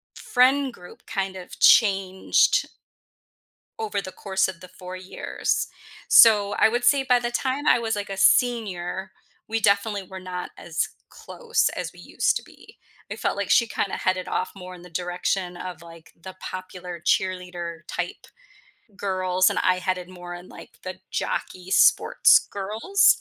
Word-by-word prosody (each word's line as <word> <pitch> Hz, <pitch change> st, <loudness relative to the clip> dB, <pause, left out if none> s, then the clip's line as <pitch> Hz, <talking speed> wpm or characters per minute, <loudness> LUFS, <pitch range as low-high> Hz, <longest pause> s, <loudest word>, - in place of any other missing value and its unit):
friend 265 Hz, +1 st, +2 dB
group 180 Hz, -5 st, -15 dB
kind 195 Hz, -1 st, -3 dB
of 180 Hz, -1 st, -10 dB
changed 195 Hz, -3 st, +4 dB, 1.1 s
over 435 Hz, -, -2 dB
the 185 Hz, -, -8 dB
course 190 Hz, 0 st, -1 dB
of 180 Hz, -3 st, -8 dB
the 185 Hz, -, -11 dB
4 185 Hz, 0 st, -9 dB
years, 185 Hz, +1 st, -3 dB, 0.4 s
so 205 Hz, -3 st, +7 dB
I -, -, +7 dB
would 240 Hz, +2 st, -1 dB
say 270 Hz, +3 st, +4 dB
by 250 Hz, -2 st, +3 dB
the 240 Hz, 0 st, -3 dB
time 265 Hz, +4 st, -2 dB
I -, -, +5 dB
was, 225 Hz, -1 st, -1 dB
like, 205 Hz, -1 st, -5 dB
a 195 Hz, -, -5 dB
senior, 190 Hz, -4 st, +1 dB, 0.4 s
we 225 Hz, 0 st, -1 dB
definitely 200 Hz, 0 st, +2 dB
were 190 Hz, +1 st, -9 dB
not 180 Hz, -1 st, -6 dB
as 165 Hz, -1 st, -2 dB, 0.2 s
close 465 Hz, -1 st, -1 dB
as -, -, -4 dB
we -, -, -14 dB
used -, -, 0 dB
to -, -, -3 dB
be. -, -, -18 dB, 0.3 s
I -, -, -4 dB
felt -, -, -2 dB
like -, -, -3 dB
she 235 Hz, -, +4 dB
kinda 200 Hz, -, -2 dB
headed 185 Hz, 0 st, -1 dB
off 185 Hz, -, -2 dB
more 185 Hz, -1 st, -9 dB
in 175 Hz, -, -14 dB
the 180 Hz, -, -13 dB
direction 180 Hz, +1 st, -2 dB
of, 180 Hz, -1 st, -7 dB
like, 165 Hz, -1 st, -14 dB
the 190 Hz, +1 st, -9 dB
popular 185 Hz, -1 st, -7 dB
cheerleader 175 Hz, -1 st, -2 dB
type 175 Hz, 0 st, -5 dB, 0.7 s
girls, 185 Hz, -2 st, +1 dB
and -, -, -1 dB
I 185 Hz, 0 st, +2 dB
headed 180 Hz, -1 st, -2 dB
more 175 Hz, -1 st, -9 dB
in, 175 Hz, +1 st, -11 dB
like, -, -, -14 dB
the 185 Hz, 0 st, -7 dB
jockey 185 Hz, 0 st, -4 dB
sports -, -, +5 dB
girls, 215 Hz, -, +2 dB
185 Hz, 165 wpm, -24 LUFS, 180-215 Hz, 1.1 s, so